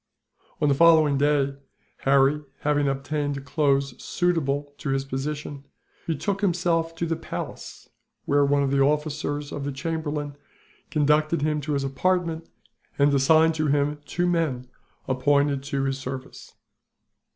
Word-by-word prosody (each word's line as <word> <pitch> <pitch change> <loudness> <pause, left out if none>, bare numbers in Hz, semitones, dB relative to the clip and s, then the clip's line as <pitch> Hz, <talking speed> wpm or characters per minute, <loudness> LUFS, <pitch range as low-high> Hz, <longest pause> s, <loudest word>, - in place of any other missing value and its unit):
On 150 - +2
the 140 - +4
following 155 -1 +5
day, 145 -1 +2 0.4
Harry, 140 +2 +3 0.2
having 145 -1 +1
obtained 140 0 -2
clothes 140 -2 0
suitable 145 -5 -1
to 140 - -4
his 135 0 0
position, 140 +1 -5 0.4
betook 195 +6 -2
himself 170 -3 0
to 170 - -2
the 165 0 -1
palace, - - -7 0.4
where 145 0 +3
one 140 0 +2
of 135 - 0
the 140 0 +2
officers 145 0 -1
of 145 - -5
the 145 - -2
chamberlain 145 0 -3 0.5
conducted 150 +1 +2
him 150 -1 0
to 150 +1 -3
his 140 -1 0
apartment, 165 +3 -1 0.5
and 140 0 +4
assigned 160 +4 +4
to 155 -1 -1
him 145 +1 0
two 175 - -1
men 160 -8 0 0.4
appointed 140 +1 +2
to 140 -1 -2
his 135 0 -1
service. 130 0 -8
145 Hz, 140 wpm, -25 LUFS, 140-160 Hz, 0.5 s, following